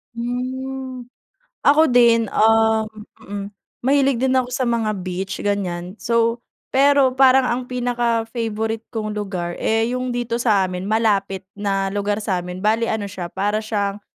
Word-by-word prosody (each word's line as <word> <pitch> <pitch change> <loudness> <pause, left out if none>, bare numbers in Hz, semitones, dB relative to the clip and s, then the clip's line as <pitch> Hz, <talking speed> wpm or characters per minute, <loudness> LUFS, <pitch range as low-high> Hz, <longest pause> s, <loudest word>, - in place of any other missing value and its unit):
Hmm. 255 +1 -4 0.6
Ako 310 +3 +5
din, 235 -2 +5
um, 220 0 +3 1.0
mahilig 275 -2 +3
din 260 +1 +1
ako 255 -1 +1
sa 255 0 -1
mga 230 -2 0
beach 185 +1 -4
ganiyan. 185 -3 -2
So, 230 0 0 0.3
pero 275 -1 +4
parang 265 -1 +5
ang 245 +1 -1
pinaka-favorite 230 -2 -1
kong 215 -2 -3
lugar 185 -4 -3
eh, 225 0 +2
'yung 255 0 -2
dito 240 -1 -2
sa 205 -5 +3
amin, 180 0 -5
malapit 200 -4 +1
na 195 -1 -1
lugar 205 +1 -1
sa'min, 180 -3 -3
bale 220 +4 +1
ano 215 -2 -2
siya 185 -3 -6
para 205 +4 -1
siyang 205 -2 -2
225 Hz, 135 wpm, -21 LUFS, 200-245 Hz, 1.0 s, Ako